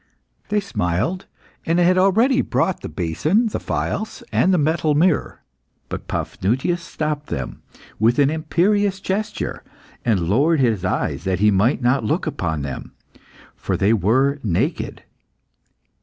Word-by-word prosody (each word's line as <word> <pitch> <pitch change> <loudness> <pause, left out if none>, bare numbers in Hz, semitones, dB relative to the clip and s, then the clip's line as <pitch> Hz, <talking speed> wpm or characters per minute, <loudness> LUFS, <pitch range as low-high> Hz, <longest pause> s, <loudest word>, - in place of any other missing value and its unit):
They 210 0 +2
smiled, 165 - -2 0.4
and 165 +1 +1
had 180 +1 +4
already 225 +8 +4
brought 190 - 0
the - - -6
basin, 155 - 0
the - - -3
phials, 215 +1 -3
and 190 - +3
the 185 - +4
metal 155 0 +1
mirror. 165 +2 +1 0.5
But - - -6
Paphnutius 130 - -1
stopped 150 -3 -3
them - - -5 0.4
with 115 +3 +3
an 140 0 +4
imperious 190 +5 +1
gesture, 205 +2 -3 0.4
and 110 -6 +2
lowered 145 - +3
his 115 -8 +1
eyes 95 - -1
that 95 -1 +1
he 105 +1 +4
might 110 +7 +2
not 125 +1 +2
look 105 - 0
upon 80 -2 -2
them, 70 -2 -6 0.6
for - - -2
they 100 +3 +3
were 130 +8 +2
naked. 95 -7 -1
150 Hz, 140 wpm, -21 LUFS, -, 0.6 s, had